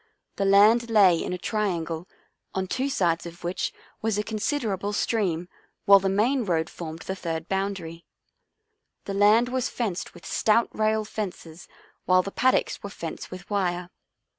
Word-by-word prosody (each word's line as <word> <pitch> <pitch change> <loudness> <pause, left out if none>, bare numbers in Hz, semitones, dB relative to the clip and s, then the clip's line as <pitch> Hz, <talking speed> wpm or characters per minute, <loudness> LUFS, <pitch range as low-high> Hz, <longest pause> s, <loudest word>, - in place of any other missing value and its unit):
The 195 - 0
land 215 +4 +5
lay 195 -6 +5
in - - -4
a 180 - -2
triangle, 175 -5 -2 0.5
on 190 0 0
two 260 +8 -1
sides 175 -10 0
of 170 +1 -12
which 175 +1 -2 0.3
was 220 -2 0
a 210 - 0
considerable 215 -2 -2
stream 185 -6 0 0.4
while 200 0 +8
the 195 0 0
main 235 +7 +2
road 170 -5 -1
formed 165 -1 -7
the 190 - -4
third 165 -3 -4
boundary. 190 -4 -3 1.0
The 200 - -4
land 210 +4 +4
was 255 -1 -1
fenced 205 -7 -3
with - - -13
stout 230 +2 +2
rail 215 0 +1
fences 180 -6 -6 0.4
while 185 0 +4
the 195 - -5
paddocks 255 +5 +1
were 200 - -6
fenced 170 -5 -7
with 185 +1 -9
wire. 180 -3 -1
195 Hz, 160 wpm, -26 LUFS, 175-215 Hz, 1.0 s, while